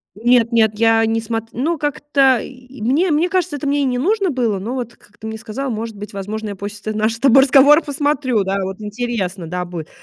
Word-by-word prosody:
Нет-нет, 230 Hz, -1 st, +3 dB
я 225 Hz, 0 st, +4 dB
не 225 Hz, 0 st, 0 dB
смот 225 Hz, 0 st, -3 dB
ну, 310 Hz, +6 st, -1 dB
как-то, 275 Hz, -3 st, +2 dB
и 255 Hz, -1 st, -12 dB
мне 290 Hz, -, +2 dB
мне 320 Hz, +4 st, +2 dB
кажется, 360 Hz, -5 st, -1 dB
это 285 Hz, -, -5 dB
мне 285 Hz, +1 st, +1 dB
и -, -, +1 dB
не 250 Hz, -1 st, 0 dB
нужно 390 Hz, -, +1 dB
было, 235 Hz, -7 st, 0 dB
но 225 Hz, +7 st, -5 dB
вот, 240 Hz, -2 st, -5 dB
как 205 Hz, -, -25 dB
ты 220 Hz, -, -9 dB
мне 220 Hz, 0 st, -5 dB
сказала, 235 Hz, +5 st, -5 dB
может 220 Hz, -1 st, -5 dB
быть, 210 Hz, +1 st, -8 dB
возможно, 210 Hz, +2 st, -5 dB
я 200 Hz, -, -6 dB
после 205 Hz, +1 st, -7 dB
ты -, -, -6 dB
нашего 220 Hz, +1 st, 0 dB
с -, -, -28 dB
тобой 270 Hz, 0 st, +6 dB
разговора 285 Hz, +3 st, +6 dB
посмотрю, 285 Hz, -6 st, 0 dB
да, 195 Hz, +1 st, -2 dB
вот 190 Hz, +2 st, -6 dB
интересно, 210 Hz, -5 st, -4 dB
да, 180 Hz, +2 st, -3 dB
будет. 170 Hz, -3 st, -7 dB
235 Hz, 225 wpm, -19 LUFS, 215-275 Hz, -, тобой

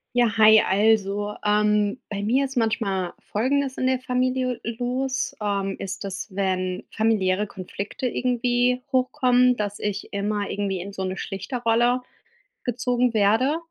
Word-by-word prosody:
Ja, 235 Hz, -3 st, +3 dB
hi, 220 Hz, 0 st, +8 dB
also, 205 Hz, 0 st, +1 dB
ähm, 210 Hz, +1 st, +2 dB
bei 200 Hz, -1 st, -3 dB
mir 250 Hz, +7 st, +2 dB
ist 270 Hz, -1 st, -3 dB
manchmal 205 Hz, -5 st, -1 dB
Folgendes 265 Hz, +4 st, -1 dB
in 255 Hz, -, 0 dB
der 260 Hz, 0 st, +2 dB
Familie 255 Hz, 0 st, -1 dB
los: 250 Hz, +3 st, -2 dB
Ähm, 200 Hz, -2 st, -1 dB
ist 195 Hz, +1 st, -5 dB
das, 195 Hz, +1 st, -5 dB
wenn 185 Hz, -1 st, -1 dB
familiäre 210 Hz, -3 st, +1 dB
Konflikte 200 Hz, +5 st, -6 dB
irgendwie 245 Hz, 0 st, +1 dB
hochkommen, 250 Hz, -1 st, +3 dB
dass 205 Hz, -2 st, -3 dB
ich 205 Hz, -1 st, -4 dB
immer 205 Hz, 0 st, -2 dB
irgendwie 195 Hz, -2 st, -2 dB
in 200 Hz, +2 st, -7 dB
so 190 Hz, -, -5 dB
'ne 185 Hz, 0 st, -3 dB
Schlichter-Rolle 235 Hz, +5 st, 0 dB, 0.6 s
gezogen 245 Hz, 0 st, 0 dB
werde, 225 Hz, +8 st, +3 dB
220 Hz, 135 wpm, -24 LUFS, 200-250 Hz, 0.6 s, hi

